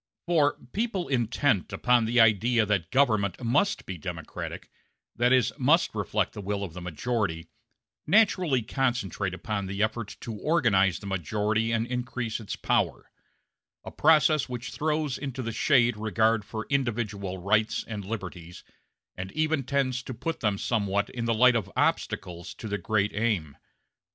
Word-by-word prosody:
For 155 -4 +2 0.2
people 205 -4 -1
intent 120 -3 +1
upon 125 -2 +2
the 120 +2 +2
idea 115 +1 +4
that 100 -6 0
government 110 -8 +2
must 175 - +1
be 95 -2 -6
democratic - - -6 0.4
that 120 +1 +2
is, 125 -2 +3
must 150 +7 +3
reflect 105 -1 -1
the 105 - -7
will 100 +1 -2
of 90 -5 -6
the 90 - -8
majority 85 -2 -2 0.6
naturally 180 - +3
concentrate 110 -7 -1
upon 100 +2 -3
the 100 +2 -1
effort 110 -1 -3
to 115 - -5
organize 105 - +2
the - - -11
majority 105 +5 0
and 115 0 +1
increase 120 -2 -3
its 110 - -5
power; - - -1 0.7
a - - -8
process 155 -2 +4
which 125 -1 -5
throws 150 -3 -1
into 135 -2 -4
the 115 - -3
shade 120 -2 +3
regard 110 +1 +1
for 110 +1 -6
individual 110 -8 -1
rights 110 +4 +1
and 105 -3 -5
liberties, 90 -4 -7 0.5
and 95 +1 -6
even 155 -1 +1
tends 130 -1 0
to 130 -1 -7
put 160 +8 -4
them 105 -3 0
somewhat 100 -2 0
in 120 -2 -4
the 115 - +2
light 125 +2 +5
of 100 -4 -2
obstacles 85 -1 -1
to 110 - -7
the 105 0 -2
great 105 -2 0
aim. 105 -10 -1
115 Hz, 155 wpm, -27 LUFS, 100-130 Hz, 0.7 s, light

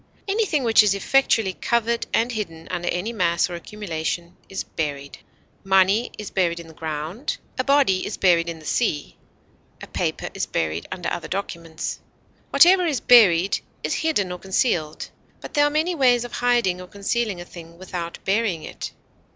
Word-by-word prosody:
Anything 390 -8 +1
which 225 -2 +6
is 205 -2 +3
effectually 225 -3 +2
covered 235 +3 0
and 235 +2 +1
hidden 165 -8 -5
under 175 -1 -2
any 195 +7 -2
mass 175 -3 +1
or - - -5
accumulation 170 -2 -4
is 195 - -4
buried. 140 -3 -5 0.4
Money 195 +4 +3
is 210 - -7
buried 170 -2 +1
in 170 - -10
the 160 - -13
ground; 160 - -4 0.2
a - - +2
body 275 -9 +3
is - - -4
buried 170 -3 +3
in 165 - -5
the 155 - -14
sea; 155 -10 -1 0.6
a - - -8
paper - - -3
is - - -2
buried 80 0 -2
under 180 -2 -4
other 175 - -4
documents. 170 -4 -4 0.5
Whatever 360 0 +6
is 285 -6 0
buried 195 -7 +5 0.2
is - - -1
hidden 300 - 0
or 180 - -5
concealed; 175 -5 -1 0.3
but - - -10
there 290 0 +4
are - - +3
many 315 +4 0
ways 250 -6 +3
of 245 - -8
hiding 235 -8 +1
or 180 - -10
concealing 200 0 -2
a 175 - -7
thing 170 -1 -12
without 175 -2 -6
burying 195 -5 0
it. - - -7
190 Hz, 170 wpm, -23 LUFS, 170-235 Hz, 0.6 s, which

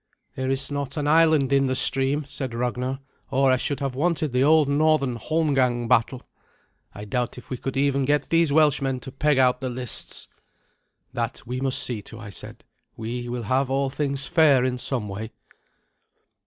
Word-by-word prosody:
"There 130 0 -3
is 135 +1 -1
not 140 0 -4
an 145 -1 -1
island 155 -3 +4
in 135 -1 +3
the 130 - 0
stream," 135 +3 0
said 135 -3 -6
Ragnar, 125 +2 -2 0.3
"or 135 0 +3
I 130 - +3
should 140 +1 -2
have 135 -2 -2
wanted 155 0 0
the 125 +1 +3
old 155 0 +5
northern 145 -3 +2
holmgang 130 -5 +1
battle. 125 +1 +1 0.7
I 105 - -9
doubt 125 +4 -2
if 125 - -12
we 130 - -2
could 135 +2 -4
even 140 -1 +2
get 145 0 +1
these 165 -2 +3
Welshmen 140 -3 +2
to 130 - -8
peg 150 +1 +1
out 125 -1 +3
the 130 - -2
lists." 125 -2 -4 0.9
"That 115 0 -3
we 125 +2 -4
must 135 -1 +2
see 115 -4 -3
to," 115 - -12
I 110 -3 -9
said. - - -9 0.3
"We 120 +2 -5
will 120 -1 -4
have 130 +4 0
all 135 0 0
things 140 -1 -2
fair 145 -5 +4
in 125 -1 -1
some 120 -5 -1
way." 110 +3 -6
135 Hz, 180 wpm, -24 LUFS, 125-145 Hz, 0.9 s, old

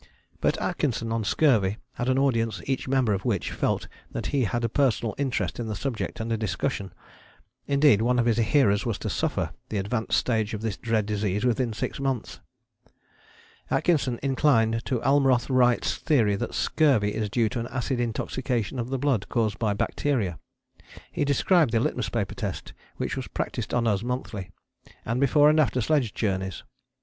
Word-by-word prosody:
But - - +1
Atkinson 115 -5 -1
on 115 -1 0
Scurvy 110 -5 +2 0.2
had 120 - -2
an 130 - +2
audience 115 -6 +1
each 135 -1 -2
member 130 -5 +2
of 95 0 -2
which 105 -7 -1
felt - - -1 0.2
that - - -5
he 135 -4 +2
had 120 +3 -2
a - - +2
personal 120 -3 +1
interest 135 -4 -1
in 115 - -3
the 110 - -3
subject 120 +1 -4
under 115 0 -1
discussion. 100 -2 -2 0.8
Indeed 140 -6 +4
one 125 +2 +2
of 120 - +2
his 115 -2 +2
hearers 110 -3 +3
was 115 -4 -2
to - - -4
suffer - - -1 0.2
the 105 - -2
advanced 110 +3 0
stage 110 -3 0
of 105 - -7
this 110 -3 -1
dread 115 -2 0
disease 105 +1 -1
within 120 0 +1
six 105 - -4
months. 135 -4 -2 1.3
Atkinson 135 -8 +1
inclined 120 -5 +2
to 125 -3 0
Almroth 135 -2 +3
Wright's 125 -2 +3
theory 115 -9 +2
that - - -4
scurvy 125 -10 +2
is 110 -1 -2
due 115 +1 +2
to 125 - -3
an 115 - -3
acid 130 0 -2
intoxication 120 0 -2
of 120 +1 -3
the 135 - -1
blood 125 -7 0
caused 110 -3 0
by 105 -3 +1
bacteria. 105 - -1 0.7
He - - -1
described 145 - +3
the 115 - +4
litmus - - -1
paper - - -2
test - - -5 0.2
which - - -2
was - - -4
practised - - -4
on 120 -1 +1
us 105 -4 +1
monthly, 115 -5 -4 0.6
and 115 +2 -1
before 145 +2 +5
and 155 +1 +4
after 130 -4 +2
sledge 125 -3 +1
journeys. 95 -3 -2
115 Hz, 175 wpm, -26 LUFS, 110-130 Hz, 1.3 s, before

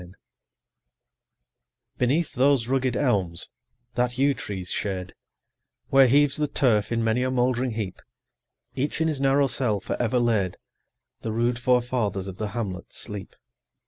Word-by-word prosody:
Beneath 145 +6 +1
those 135 -2 +3
rugged 130 -1 0
elms, 95 - 0 0.4
that 125 +1 0
yew 140 +1 +3
tree's 95 -7 -5
shade, 95 -3 -3 0.8
Where 135 -1 +6
heaves 145 +3 +4
the 150 -1 0
turf 115 -8 +1
in 115 -1 +1
many 115 +2 +1
a 130 - +1
mouldering 125 -1 +1
heap, 105 -4 -5 0.7
Each 145 +4 -2
in 160 - +2
his 150 -4 -1
narrow 140 +1 +4
cell 120 -5 +1
forever 120 +4 -1
laid, 110 -7 +1
15 - - -22 0.6
The 110 - -3
rude 120 +1 0
forefathers 125 -6 0
of 95 -1 -8
the 110 - -1
hamlet 100 -4 -5
sleep. 105 -3 -5
120 Hz, 140 wpm, -25 LUFS, 105-135 Hz, 0.8 s, Where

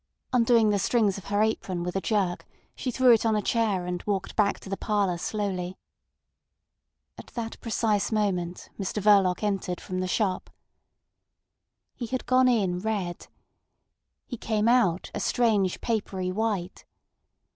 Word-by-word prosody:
Undoing 230 -3 +4
the 200 - +1
strings 205 -1 +1
of 185 - -15
her 205 +3 +1
apron 185 -5 -1
with 180 +1 -4
a 195 - 0
jerk, 195 -5 -1 0.3
she 255 - -3
threw 255 0 +5
it 225 - +2
on 225 -1 +2
a 210 - +1
chair, 210 -6 +1
and 180 0 -3
walked 200 -2 -2
back 205 -2 +2
to - - -13
the 195 - -2
parlour 200 -3 0
slowly. 190 -3 -3 1.4
At - - -10
that 230 -2 -5
precise 220 -3 0
moment 185 -5 -1
Mr 195 +2 -2
Verloc 195 -2 +4
entered 195 -4 -1
from 185 0 -5
the 185 - -1
shop. 185 -1 -1 1.4
He 240 - -6
had 255 +2 -3
gone 255 +1 +4
in 195 -8 +2
red. 195 -4 -3 1.0
He 245 - -6
came 215 0 0
out 225 -8 +2
a - - -3
strange 210 -6 +1
papery 195 -5 -2
white. 200 -3 -2
205 Hz, 150 wpm, -27 LUFS, 185-225 Hz, 1.4 s, threw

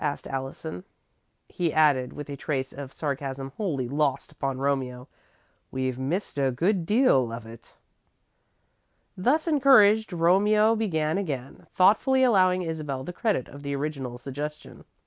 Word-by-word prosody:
asked 145 -1 -2
Allison. 135 - -6 0.6
He 170 -3 -1
added, 145 -5 +3
with 150 - -8
a 140 - -6
trace 135 -2 -3
of 140 -1 -8
sarcasm 135 -1 -4
wholly 150 - -2
lost 145 +1 -1
upon 135 -3 -3
Romeo: 130 -2 -2 0.6
"We've 130 -1 -3
missed 145 +4 -3
a 135 -1 +2
good 170 - 0
deal 210 - +3
of 115 0 -7
it." 115 0 -14 1.4
Thus 280 - +1
encouraged, 235 -9 +5
Romeo 205 +6 +3
began 160 -6 0
again, 135 -9 -5
thoughtfully 255 +8 +3
allowing 185 -6 +3
Isabel 150 -5 -4
the 180 - -7
credit 210 - -1
of 140 - -12
the 140 0 -3
original 135 -4 -4
suggestion. 145 +4 -7
150 Hz, 135 wpm, -26 LUFS, 135-190 Hz, 1.4 s, encouraged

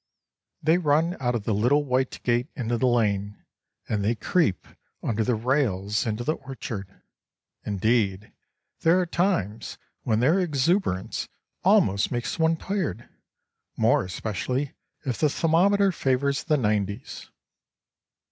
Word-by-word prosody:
They 160 +3 +4
run 165 +2 +2
out 120 -2 0
of 115 - -2
the 110 - 0
little 125 +8 +2
white 130 0 -1
gate 120 +1 +1
into 120 -2 -1
the 130 +2 +1
lane, 105 -4 0 0.4
and 105 -2 -1
they 110 +4 +1
creep 115 - 0 0.4
under 110 -1 0
the 120 +2 +1
rails 110 -4 0
into 110 +2 -2
the 155 +5 -1
orchard. 125 -7 -6 0.8
Indeed, 105 -1 0 0.5
there 165 +3 +4
are 180 - +1
times 165 - -1 0.2
when 110 -1 +1
their 155 +10 +3
exuberance 155 - 0 0.3
almost 100 +1 +3
makes 120 +4 -3
one 160 0 +3
tired, 170 - -3 0.7
more - - +3
especially 115 +8 -3 0.3
if 125 -4 -2
the 155 - +3
thermometer 190 +6 +3
favours 140 -2 0
the 155 -2 +2
nineties! 105 -4 -2
125 Hz, 130 wpm, -25 LUFS, 105-155 Hz, 0.8 s, They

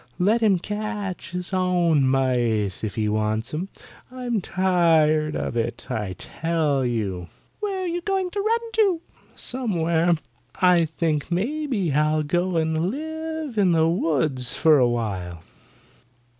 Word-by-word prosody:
Let 210 +6 +2
him 205 -4 +4
catch 210 -1 -4
his 180 +2 -5
own 175 -6 +2
mice 120 -7 +1
if 105 -2 -3
he 110 -1 0
wants 110 +3 -1
'em. 175 +6 -3 0.4
I'm 245 -4 -2
tired 165 -5 +2
of - - -3
it, 120 0 -2
I 105 -4 -2
tell 155 - -1
you." 100 -8 -2 0.3
"Where 395 -3 -2
are - - -2
you 350 +1 -2
going 380 -1 -1
to 405 - -2
run 450 +3 +2 0.2
to?" 385 -7 +3 0.3
"Somewhere. 170 -9 +1 0.4
I 180 -2 +4
think 160 -1 -2
maybe 220 - -1
I'll 155 +1 +2
go 175 +3 0
and 160 +2 0
live 315 -1 -4
in 185 -4 +4
the 160 -1 +3
woods 150 -7 0
for 155 -3 +5
awhile. 100 -9 -1
170 Hz, 135 wpm, -24 LUFS, 130-210 Hz, 0.4 s, for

